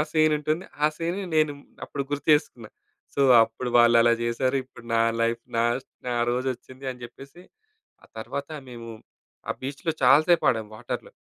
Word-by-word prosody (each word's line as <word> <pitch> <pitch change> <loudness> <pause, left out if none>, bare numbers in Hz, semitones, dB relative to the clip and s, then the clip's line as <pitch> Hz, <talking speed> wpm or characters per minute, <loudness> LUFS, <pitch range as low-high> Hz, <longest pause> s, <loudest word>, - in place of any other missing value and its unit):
ఆ - - +4
సీనుంటుంది. 155 +2 +1 0.2
ఆ - - +7
సీన్‌ని 175 +4 -3
నేను 155 -1 +3 0.3
అప్పుడు 140 - -4
గుర్తు 145 +1 -4
జేసుకున్నా. 125 -7 0 0.5
సో, - - -1 0.2
అప్పుడు 115 +2 -3
వాళ్ళలా 120 0 +6
జేశారు. 125 +3 0
ఇప్పుడు 125 -2 -16
నా 115 - +3 0.2
లైఫ్ 115 0 0
నా 115 - +3 0.4
నా 120 - -1 0.2
రోజొచ్చింది 130 +1 -4
అని 125 -1 -10
జెప్పేసి, 140 +8 -13 0.6
ఆ - - -18
తర్వాత 140 +5 -5 0.2
మేము 115 -1 -9 0.6
ఆ - - +2
బీచ్‌లో 140 +4 -3
చాలా 145 +3 +7
సేపు 175 -1 +4
ఆడాం 110 -3 -3
వాటర్‌లో. 120 +2 -6
130 Hz, 155 wpm, -25 LUFS, 120-150 Hz, 0.6 s, ఆ